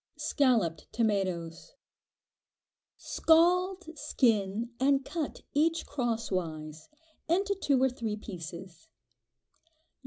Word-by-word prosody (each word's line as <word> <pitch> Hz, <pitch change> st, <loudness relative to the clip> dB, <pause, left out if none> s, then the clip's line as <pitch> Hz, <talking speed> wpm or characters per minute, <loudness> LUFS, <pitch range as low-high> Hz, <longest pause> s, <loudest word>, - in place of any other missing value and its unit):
Scalloped 230 Hz, -, +1 dB
Tomatoes. 195 Hz, -, -1 dB, 1.2 s
Scald, 360 Hz, +3 st, +3 dB
skin, 225 Hz, -5 st, +1 dB
and 270 Hz, 0 st, +3 dB
cut 320 Hz, -4 st, -4 dB
each 325 Hz, +3 st, +2 dB
crosswise, 180 Hz, -, -3 dB, 0.4 s
into 390 Hz, +4 st, +2 dB
two 290 Hz, -9 st, +1 dB
or 265 Hz, -, +4 dB
three 230 Hz, -4 st, -3 dB
pieces. 175 Hz, -4 st, -9 dB
235 Hz, 80 wpm, -30 LUFS, 185-305 Hz, 1.2 s, or